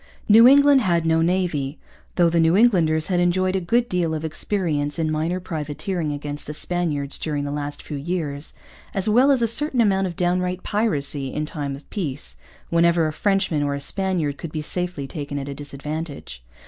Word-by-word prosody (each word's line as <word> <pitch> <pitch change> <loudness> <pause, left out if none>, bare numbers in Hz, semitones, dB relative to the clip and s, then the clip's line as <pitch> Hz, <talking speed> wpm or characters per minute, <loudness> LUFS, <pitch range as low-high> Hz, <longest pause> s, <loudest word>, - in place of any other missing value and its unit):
New 225 +3 +8
England 280 0 +6
had 170 -6 +1
no 160 0 +3
navy, 165 -5 0 0.4
though 175 -2 +4
the 170 0 +2
New 165 +3 +4
Englanders 165 -9 +3
had 180 -2 0
enjoyed 185 +2 +1
a - - +2
good 235 +7 +1
deal 170 -5 0
of 155 +1 -4
experience 155 -3 -2
in 160 -1 0
minor 160 +4 -1
privateering 155 0 -3
against 145 0 -5
the 150 - -5
Spaniards 150 -5 0
during 150 -2 -2
the 145 - -3
last 145 0 -4
few 150 - -6
years, 150 -2 -3 0.4
as 195 +1 +2
well 245 +6 +4
as 265 -4 +3
a - - +3
certain 270 +3 0
amount 195 -4 +3
of 175 - -6
downright 180 +1 -1
piracy 145 - -1
in 155 - -2
time 145 -3 -4
of 140 - -14
peace, 145 -9 -4 0.4
whenever 170 0 +3
a 155 - -2
Frenchman 195 -4 +1
or 145 -1 0
a - - -4
Spaniard 165 -2 -1
could 165 - -6
be 155 -1 -4
safely 180 -3 -3
taken 145 0 -6
at 140 0 -4
a 140 - -4
disadvantage. 145 - -6
165 Hz, 190 wpm, -22 LUFS, 145-185 Hz, 0.4 s, New